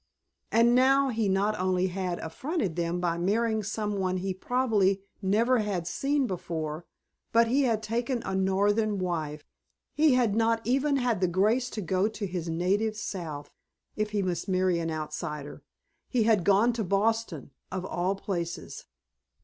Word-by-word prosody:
And 230 +2 +5
now 270 +2 +4
he 225 -4 0
not 200 +2 +1
only 185 0 +1
had 180 -1 -3
affronted 205 - -3
them 170 0 -1
by 170 -1 -1
marrying 220 +4 +1
some 210 0 -3
one 185 -1 0
he 190 +1 -2
probably 200 -3 +1 0.2
never 225 +6 +2
had 200 -5 -2
seen 275 +9 0
before, 165 -5 -4 0.4
but 230 0 +5
he 270 +3 +3
had 220 -3 0
taken 235 +3 -2
a 195 - -3
Northern 200 +3 +1
wife; 155 -5 -3 0.5
he 300 -3 +4
had 235 -5 +2
not 230 0 +2
even 275 +4 +2
had 245 -7 0
the 185 - +3
grace 210 +8 +2
to 215 - -5
go 185 +2 +1
to 215 -1 -4
his 175 -3 -4
native 200 +6 0
South, 165 -8 -5 0.4
if 215 0 -1
he 210 -2 -1
must 180 0 -2
marry 185 -2 +2
an 165 0 -2
outsider; 150 -1 -5 0.5
he 245 -4 +1
had 215 -4 +3
gone 205 +5 +4
to 225 -1 -2
Boston 200 - 0 0.2
of 185 0 -3
all 185 +1 -1
places! 175 -4 -5
200 Hz, 160 wpm, -28 LUFS, 180-230 Hz, 0.5 s, And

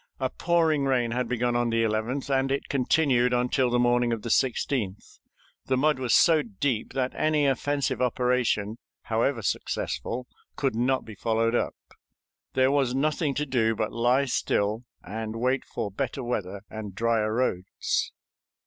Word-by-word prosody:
A - - -1
pouring 160 -4 +2
rain 125 -3 +1
had 125 0 -1
begun 120 0 0
on 120 0 +1
the 115 0 +1
11th, 115 +5 -1
and 135 0 +1
it 140 - -2
continued 130 -2 +2
until 125 +1 +2
the 120 - +2
morning 120 0 +2
of 115 -2 -2
the 115 - -4
16th; 120 -6 -1 0.5
the 130 - +2
mud 150 0 +2
was 125 -2 +2
so 160 -3 +5
deep 115 0 -2
that 130 -1 -1
any 155 -1 +1
offensive 140 0 0
operation, 125 -3 +1 0.2
however 115 +1 0
successful, 125 +5 -2 0.3
could 135 -4 0
not 130 +3 +1
be 110 - -9
followed 115 +2 0
up. - - 0 0.8
There 130 0 +3
was 135 -3 +1
nothing 150 0 0
to 150 - -1
do 115 -5 +1
but 110 0 -2
lie 120 +4 +2
still 110 -2 0 0.2
and 110 +1 -5
wait 125 +3 0
for 100 - -4
better 130 +7 -3
weather 100 -5 -3
and 105 -3 -7
drier 115 0 +1
roads. 95 -7 -1
125 Hz, 155 wpm, -26 LUFS, 115-135 Hz, 0.8 s, so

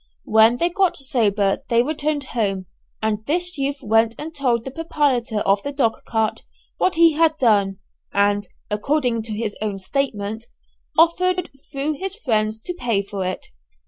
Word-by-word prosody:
When 220 +2 +5
they 340 +6 +2
got 370 0 +1
sober 215 -8 +1
they 235 0 +4
returned 300 0 -1
home, 195 -5 -1 0.4
and 220 -1 0
this 355 +4 0
youth 280 0 -2
went 225 +1 +3
and 320 +2 -6
told 250 -6 0
the 265 - -5
proprietor 265 -8 0
of 195 0 +2
the 285 - -4
dog 265 -6 +2
cart 220 -1 0 0.4
what 370 - +2
he 330 -1 +6
had 315 0 +3
done, 200 -7 +3 0.3
and 205 0 +2 0.2
(according 245 +1 0
to 220 0 -7
his 210 0 -3
own 210 -2 -2
statement) 220 0 -2 0.5
offered, 360 +2 +3 0.2
through 285 +1 -2
his 385 0 -3
friends, 220 - 0
to 355 - -4
pay 230 - 0
for 200 -1 -4
it. 185 0 -3
240 Hz, 160 wpm, -22 LUFS, 215-305 Hz, 0.5 s, he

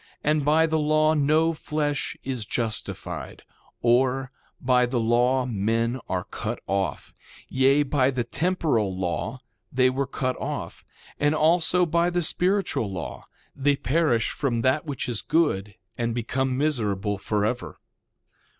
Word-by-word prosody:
And 150 0 +2
by 155 +3 +4
the 160 -1 0
law 155 +1 +3
no 155 +2 +3
flesh 150 -2 -2
is 130 -4 -3
justified; 110 0 -4 0.4
or, 130 +2 +2 0.3
by 125 -1 +3
the 120 0 -1
law 120 +3 +2
men 115 +2 0
are 90 -1 -1
cut - - -5
off. 95 0 -2 0.4
Yea, 135 +2 +4
by 135 -2 +2
the 125 -3 -1
temporal 140 - 0
law 95 +7 -3 0.3
they 130 0 +3
were 135 +1 -1
cut 130 -2 -2
off; - - -5 0.4
and 145 +1 +2
also, 170 +3 +3
by 170 +1 +2
the 175 0 0
spiritual 180 - 0
law 90 -3 -6 0.3
they 140 +1 +2
perish 135 -3 +1
from 120 -5 -1
that 130 +6 +1
which 140 -2 -3
is 120 -4 -2
good, 105 - 0 0.2
and 115 -1 -1
become 130 +2 -1
miserable 105 -9 0
forever. 110 +5 -2
130 Hz, 135 wpm, -25 LUFS, 115-150 Hz, 0.4 s, by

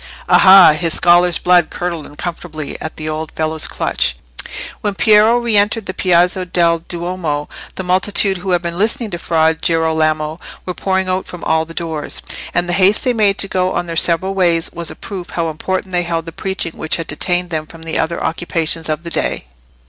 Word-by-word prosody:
Aha! 190 -3 +8
his 165 +1 -1
scholar's 175 0 +4
blood 175 -2 +3
curdled 170 -3 -4
uncomfortably 155 -1 -6
at 155 - -6
the 155 - -6
old 155 0 -4
fellow's 155 0 -2
clutch!" - - -1 0.6
When 205 -2 -2
Piero 215 +2 +5
re 235 -2 0
entered 205 +1 +2
the 185 - -4
Piazza 180 +1 +2
del 170 -2 +1
Duomo 170 -3 -4 0.3
the 190 - -4
multitude 190 +2 +2
who 185 +2 -6
had 175 -1 +1
been 170 +1 -4
listening 225 +1 0
to 175 - -4
Fra 160 -2 +2
Girolamo 160 -1 0 0.3
were 180 - -3
pouring 190 +2 -1
out 185 +1 -2
from 175 - -9
all 160 0 +1
the 165 +1 -11
doors, 160 -3 -4 0.3
and 175 0 0
the 175 - -1
haste 195 +3 +3
they 250 - +2
made 205 -3 +2
to 195 - +1
go 185 -1 0
on - - -1
their 165 -1 -5
several 175 +4 +2
ways 170 -4 +1
was 170 -2 -5
a - - -7
proof 185 -3 -8
how 165 -2 -2
important 185 +4 -3
they 175 -1 +1
held 165 -2 -2
the 165 - -7
preaching 190 -1 -3
which 155 - 0
had 165 - -4
detained 175 +4 -2
them 155 -1 -3
from 165 0 -10
the 165 0 -2
other 170 +1 -2
occupations 165 -1 -1
of 155 +1 -2
the 170 - -7
day. - - -1
175 Hz, 200 wpm, -17 LUFS, 160-185 Hz, 0.6 s, Aha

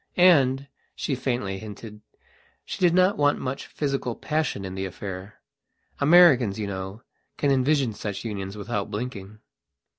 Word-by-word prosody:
Andshe 140 -5 +2
faintly 120 -7 -2
hintedshe 105 - -12
did 175 -2 +4
not 185 0 +3
want 145 0 +3
much 130 +1 -4
physical 135 -5 -2
passion 150 -10 -2
in 95 - -6
the 95 0 -3
affair. 95 +2 -7 0.6
Americans, 140 - +6
you 105 - -2
know, 95 +2 -6 0.3
can 145 - +1
envisage 135 -2 +2
such 105 +1 -5
unions 100 -2 -5
without 105 -1 -3
blinking. 105 -2 -6
120 Hz, 125 wpm, -25 LUFS, 100-140 Hz, 0.6 s, Americans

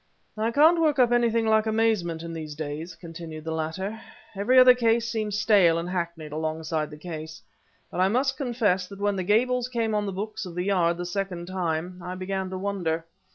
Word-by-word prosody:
"I 220 +1 0
can't 315 +7 +5
work 305 -3 +3
up 245 -2 +4
anything 235 -1 +2
like 220 0 +3
amazement 215 -7 +1
in 170 0 -6
these 155 -2 -6
days," 155 +3 -5
continued 165 -2 -9
the 160 - -4
latter; 190 +7 -3 0.3
"every 215 +7 +2
other 255 0 +9
case 230 -1 +2
seems 215 -3 -2
stale 200 -6 +4
and 170 +1 -3
hackneyed 170 -4 -4
alongside 155 0 -2
the 150 - -10
case. 155 -1 -7 0.5
But - - -4
I 185 - +4
must 260 +6 +1
confess 225 -9 0
that 200 - -10
when 205 0 0
the 190 - -1
Gables 245 +5 +2
came 230 -3 -1
on 210 -1 0
the - - -2
books 215 +3 -5
of 180 -3 -8
the 180 - -1
Yard 175 -4 +2
the 175 - -4
second 180 -1 -3
time, 180 -1 -3
I 180 0 -5
began 190 0 -3
to 185 - -5
wonder. 180 -5 -2
190 Hz, 200 wpm, -26 LUFS, 165-225 Hz, 0.5 s, other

